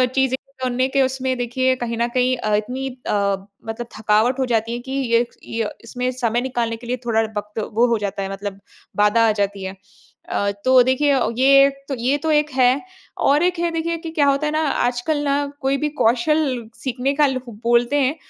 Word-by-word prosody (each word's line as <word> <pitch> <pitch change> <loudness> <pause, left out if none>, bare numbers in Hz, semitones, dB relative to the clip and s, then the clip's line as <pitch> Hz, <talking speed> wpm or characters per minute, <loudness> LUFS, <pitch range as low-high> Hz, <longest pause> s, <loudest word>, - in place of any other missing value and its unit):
चीज़ें 265 -1 +2 0.3
सुनने 255 +1 +1
के 275 +1 +1
उसमें 260 0 0
देखिए 255 +2 +1
कहीं 235 -2 -4
न 235 +1 +1
कहीं 255 0 +3
अ, 215 -3 0
इतनी 250 +6 -2 0.2
अ, 200 -1 +1 0.3
मतलब 225 +1 -5
थकावट 220 +4 +2
हो 260 - +2
जाती 230 -1 0
है 240 - -3
कि 265 +2 -9
ये 240 -3 +2 0.2
ये 225 -2 -3
इसमें 250 +2 -3
समय 240 -2 0
निकालने 240 -3 -2
के 235 - -12
लिए 250 +1 -1
थोड़ा 225 -1 +2 0.2
वक़्त 210 +1 -5
वो 235 +3 +4
हो 235 -1 +2
जाता 200 -1 -3
है, 195 - -4
मतलब 195 0 -6 0.4
बाधा 210 +2 +4
आ - - +4
जाती 200 -2 -2
है। 190 +1 -5 0.5
अ, 200 0 0
तो 255 0 +7
देखिए 260 +3 +2
अ, 270 -3 +2
ये 275 +1 +6 0.2
तो 275 - -2
ये 260 +4 +1
तो - - +3
एक 300 0 +2
है। 255 +1 +3 0.4
और 290 +4 +3
एक 360 -1 +1
है 340 0 0
देखिए 330 +1 -2
कि 330 0 -7
क्या 310 -3 +2
होता 280 +2 +2
है 300 - 0
ना 310 - +1
आजकल 245 +4 0
ना 285 0 +1 0.2
कोई 270 0 +1
भी 300 +2 -1
कौशल 250 +1 +1 0.2
सीखने 260 +1 -1
का 300 +1 +4
ल 260 -1 -1
बोलते 235 +3 +1
हैं, 270 +3 +1
250 Hz, 210 wpm, -21 LUFS, 230-275 Hz, 0.5 s, तो